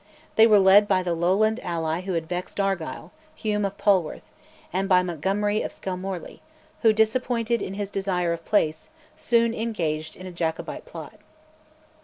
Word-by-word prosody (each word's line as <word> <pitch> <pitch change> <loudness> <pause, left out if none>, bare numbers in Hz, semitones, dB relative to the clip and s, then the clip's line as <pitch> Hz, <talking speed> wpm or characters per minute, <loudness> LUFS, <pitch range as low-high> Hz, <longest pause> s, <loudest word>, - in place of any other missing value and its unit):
They 220 +1 +7
were 215 -2 +6
led 200 +1 +6
by 185 -2 +2
the 175 -1 -1
Lowland 195 +7 +2
ally 165 0 -2
who 190 0 -4
had 165 -1 -2
vexed 180 +3 -5
Argyll, 195 -5 -2 0.2
Hume 210 -6 -1
of 195 0 -4
Polwarth; 190 -6 +1 0.4
and 195 +2 -1
by 180 -1 +5
Montgomery 195 +5 -1
of - - -4
Skelmorley, 185 -1 -6 0.4
who, 225 - +6
disappointed 230 +1 +1
in 190 - -4
his 205 -1 -4
desire 180 -3 0
of 165 0 -7
place, 160 -7 0 0.3
soon 235 -1 +2
engaged 165 -10 -3
in 185 - -11
a 185 - -7
Jacobite 165 -2 -4
plot. - - -10
195 Hz, 160 wpm, -25 LUFS, 175-215 Hz, 0.4 s, They